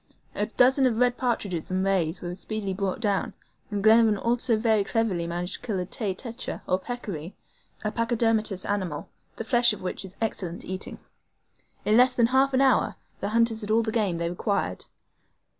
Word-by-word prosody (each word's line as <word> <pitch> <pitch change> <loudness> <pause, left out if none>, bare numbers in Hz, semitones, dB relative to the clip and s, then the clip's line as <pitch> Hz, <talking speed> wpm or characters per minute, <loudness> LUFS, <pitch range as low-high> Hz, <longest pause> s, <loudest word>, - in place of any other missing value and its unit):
A 210 - -1
dozen 260 +3 +4
of 230 -3 0
red 245 0 +3
partridges 210 -10 -2
and 185 +1 0
rays 185 -4 0
were 175 0 -4
speedily 200 +1 -4
brought 195 +1 -2
down, 205 -3 -1 0.3
and 205 -2 -3
Glenarvan 220 -1 +6
also 235 +2 +1
managed 215 0 0
very 220 -3 +3
cleverly 195 -5 0
to 175 +1 -3
kill 215 -5 -2
a 180 - -2
TAY 195 0 -2
TETRE, 235 +3 -5
or 185 - +2
peccary, 190 -7 -6 0.5
a 210 - 0
pachydermatous 225 -4 +1
animal, 185 -7 -2 0.3
the - - -4
flesh 240 0 +4
of 210 - -9
which 185 - -4
is 190 -1 -10
excellent 185 -6 -3
eating. 185 0 -5 0.9
In 215 +1 +4
less 250 +1 +6
than 240 -2 +3
half 265 +3 +3
an 260 - +3
hour 265 -3 +3 0.2
the 200 - -2
hunters 230 0 +2
had 205 - -6
all 225 +1 +3
the 220 - -2
game 205 -7 0
they 170 0 -1
required. 200 +3 -2
215 Hz, 185 wpm, -26 LUFS, 190-235 Hz, 0.9 s, Glenarvan